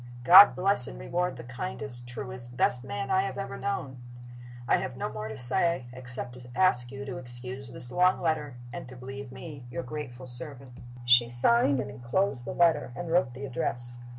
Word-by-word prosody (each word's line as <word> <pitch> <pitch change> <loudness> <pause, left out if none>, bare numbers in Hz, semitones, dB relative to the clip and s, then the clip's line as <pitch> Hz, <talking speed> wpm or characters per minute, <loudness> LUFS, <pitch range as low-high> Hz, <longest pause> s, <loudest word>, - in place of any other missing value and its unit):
God 185 +7 +9
bless 190 -8 +3
and - - -9
reward 180 - -2
the 120 - -8
kindest, 125 -1 -3
truest, 125 0 -1
best 125 -1 +3
man 130 +2 -4
I 190 - +4
have 195 - -4
ever 195 - -5
known! 140 -10 -4 0.7
"I - - +4
have 130 - -5
no - - -4
more 105 0 -5
to 110 0 -7
say, 130 +4 +2
except 125 -1 -7
to 125 - -13
ask 125 -10 +2
you 135 0 -7
to 130 - -6
excuse 125 +1 -9
this 120 0 -7
long 180 +1 +3
letter, 155 -5 -1 0.2
and - - -7
to 130 - -11
believe 130 +1 -8
me 140 -2 -10
your 125 +1 -5
grateful 130 -2 -7
servant, 130 +1 -2 0.2
." 120 0 -14
She 120 -1 +6
signed 140 - +3
and - - -4
inclosed 125 +1 -1
the - - -4
letter, 165 -6 +3
and 175 +1 -5
wrote 170 -8 +2
the 135 +1 -6
address. 120 -1 -3
130 Hz, 195 wpm, -28 LUFS, 120-155 Hz, 0.7 s, God